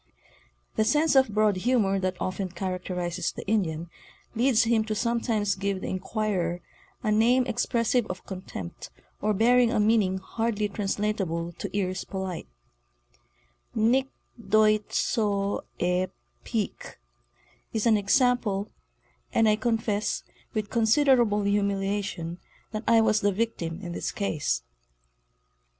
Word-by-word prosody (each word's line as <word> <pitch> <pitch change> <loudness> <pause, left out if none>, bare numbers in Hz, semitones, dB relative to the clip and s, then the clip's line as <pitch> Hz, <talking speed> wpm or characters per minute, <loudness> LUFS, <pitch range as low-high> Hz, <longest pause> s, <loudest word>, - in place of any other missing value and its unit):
The 220 - +4
sense 300 +7 +3
of 265 -3 +5
broad 210 -2 +2
humor 200 -2 +2
that 185 -1 -2
often 185 0 -2
characterizes 180 -1 -3
the - - -8
Indian 175 -6 0 0.5
leads 240 0 +3
him 230 -1 +2
to 215 -1 -2
sometimes 225 -3 0
give 195 0 -2
the - - -5
inquirer 185 -3 -1 0.4
a 215 - +1
name 240 +4 +4
expressive 235 0 +1
of. 185 - -6
contempt 185 - -7 0.3
or 210 0 +1
bearing 240 +3 +4
a 235 - +1
meaning 210 -3 +3
hardly 215 +2 -1
translatable 195 -4 -2
to 185 - -5
ears 185 -1 -1
polite 190 - -5 0.7
—' - - -38 0.2
Nic 265 +1 +2 0.4
doit 215 -1 +3
so 200 -3 0
e 180 +1 +1 0.4
Peak" - - -4 0.7
is 220 -1 -1
an 225 -2 +5
example—and 215 0 0
I 215 - +5
confess, 220 -2 -1 0.3
with 215 -1 -2
con 230 -2 +2
siderable 235 -5 +4
humiliation, 200 -4 -1 0.3
that 215 +1 -4
I 230 -1 +6
was 215 -1 +3
the 205 - +3
victim 185 -6 -2
in 175 - -5
this - - -3
case. 155 - -1
205 Hz, 125 wpm, -27 LUFS, 185-225 Hz, 0.7 s, I